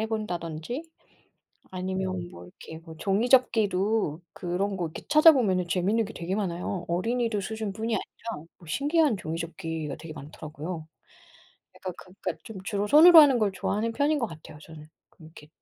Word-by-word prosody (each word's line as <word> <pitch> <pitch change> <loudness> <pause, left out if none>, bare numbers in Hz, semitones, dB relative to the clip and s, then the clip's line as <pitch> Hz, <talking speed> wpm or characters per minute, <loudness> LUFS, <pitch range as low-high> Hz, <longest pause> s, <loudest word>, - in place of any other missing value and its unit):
해본다든지, 210 - -4 0.9
아니면 185 -1 -3
뭐 85 - -11
이렇게 160 - -11
뭐 160 -2 -11
종이접기도 210 - +2
그런 190 +3 -2
거 175 - -1
이렇게 160 - -8
찾아보면은 255 - +5
재밌는 195 +6 +1
게 220 - -9
되게 175 +3 -3
많아요. 180 -2 -3
어린이들 225 +4 0
수준뿐이 220 +2 -3
아니라 225 -10 -6
뭐 170 - -17
신기한 285 - +2
종이접기가 165 -3 -5
되게 160 0 -9
많더라고요. 155 +2 -8 0.9
약간 185 -1 -6
그러니까 185 +2 -7
좀 225 -3 -9
주로 205 +1 -2
손으로 325 +7 +9
하는 275 -5 +6
걸 210 -2 +2
좋아하는 210 +4 -1
편인 290 +5 +1
것 240 - 0
같아요, 160 -3 -12
저는. 155 -1 -12 0.2
그렇게 155 -2 -15
190 Hz, 365 characters per minute, -27 LUFS, 165-225 Hz, 0.9 s, 손으로